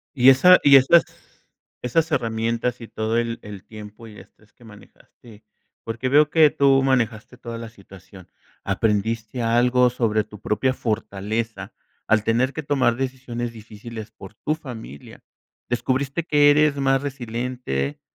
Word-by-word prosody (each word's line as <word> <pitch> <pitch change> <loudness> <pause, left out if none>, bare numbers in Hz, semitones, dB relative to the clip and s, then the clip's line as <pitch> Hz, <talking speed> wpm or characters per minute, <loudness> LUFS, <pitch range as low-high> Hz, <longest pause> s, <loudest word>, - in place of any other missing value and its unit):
Y 130 -1 +6
esa 180 +8 +7
y 140 -1 +7
esas 135 +6 +5 0.8
esas 160 +7 0
herramientas, 115 0 -2
y 115 - -8
todo 110 +1 -2
el 115 0 -2
el 100 -2 -10
tiempo 105 +1 -12
y 105 -1 -13
estrés 105 -1 -21
que - - -22
manejaste, 110 +1 -17 0.4
porque 120 +3 -4
veo 150 +2 +4
que 155 -1 +5
tú 135 -1 +3
manejaste 120 -2 -1
toda 115 -2 -8
la 115 0 -8
situación, 95 -3 -16 0.3
¿aprendiste 110 +3 -1
algo 125 +2 +3
sobre 110 -3 0
tu 105 - -14
propia 130 +5 0
fortaleza, 110 0 -4 0.3
al 110 -1 +2
tener 120 +5 +1
que 160 - -5
tomar 135 -5 +1
decisiones 125 -3 -5
difíciles 110 0 -10
por 100 -2 -13
tu 155 - -2
familia? 110 - -11 0.5
¿Descubriste 130 +6 -1
que 145 -3 +4
eres 150 -1 +3
más 135 -1 +1
resiliente, 120 - -4
120 Hz, 140 wpm, -22 LUFS, 110-135 Hz, 0.8 s, esa